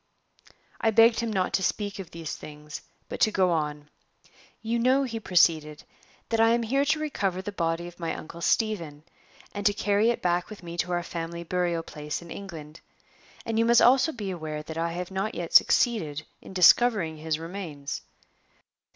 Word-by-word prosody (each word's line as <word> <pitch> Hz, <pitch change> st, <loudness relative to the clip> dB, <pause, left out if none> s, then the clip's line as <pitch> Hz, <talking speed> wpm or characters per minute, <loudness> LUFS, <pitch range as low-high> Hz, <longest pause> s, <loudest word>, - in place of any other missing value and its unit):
I 225 Hz, -, +2 dB
begged 225 Hz, +1 st, +5 dB
him 230 Hz, -1 st, -1 dB
not 190 Hz, -3 st, -1 dB
to -, -, +2 dB
speak 205 Hz, +1 st, -2 dB
of 190 Hz, -, -7 dB
these 165 Hz, -2 st, -6 dB
things, 150 Hz, 0 st, -9 dB, 0.3 s
but -, -, -6 dB
to 215 Hz, -, +4 dB
go 185 Hz, -3 st, +2 dB
on. 150 Hz, -2 st, -2 dB, 0.8 s
"You 230 Hz, +1 st, 0 dB
know," 260 Hz, +3 st, +3 dB
he 230 Hz, -4 st, -4 dB
proceeded, 160 Hz, -6 st, +2 dB, 0.5 s
"that 225 Hz, -, 0 dB
I 225 Hz, 0 st, +5 dB
am 235 Hz, -, -1 dB
here 275 Hz, +5 st, +1 dB
to 305 Hz, +2 st, +1 dB
recover 200 Hz, -12 st, -2 dB
the 205 Hz, -, -4 dB
body 170 Hz, -2 st, -2 dB
of 175 Hz, 0 st, -13 dB
my 165 Hz, -1 st, -2 dB
Uncle 170 Hz, +2 st, -9 dB
Stephen, 170 Hz, -10 st, 0 dB, 0.5 s
and 205 Hz, -, -4 dB
to 205 Hz, -, +3 dB
carry 205 Hz, +2 st, +2 dB
it 235 Hz, -, -1 dB
back 175 Hz, 0 st, 0 dB
with 210 Hz, -4 st, -10 dB
me 170 Hz, 0 st, -7 dB
to 180 Hz, -, -1 dB
our 175 Hz, 0 st, 0 dB
family 170 Hz, 0 st, -5 dB
burial 175 Hz, -1 st, -1 dB
place 150 Hz, -2 st, -5 dB
in 170 Hz, -1 st, -12 dB
England, 160 Hz, -6 st, -9 dB, 0.6 s
and 225 Hz, 0 st, -1 dB
you 230 Hz, -, +3 dB
must 235 Hz, 0 st, +6 dB
also 260 Hz, +5 st, +5 dB
be 210 Hz, -8 st, -5 dB
aware 155 Hz, -3 st, -5 dB
that 160 Hz, +1 st, -8 dB
I 165 Hz, 0 st, -1 dB
have 180 Hz, +1 st, -5 dB
not 195 Hz, +3 st, -2 dB
yet 170 Hz, -1 st, -5 dB
succeeded 160 Hz, -11 st, +3 dB, 0.2 s
in -, -, -12 dB
discovering 185 Hz, -2 st, +4 dB
his 155 Hz, 0 st, -2 dB
remains. 165 Hz, -4 st, -6 dB
180 Hz, 185 wpm, -27 LUFS, 165-220 Hz, 0.8 s, must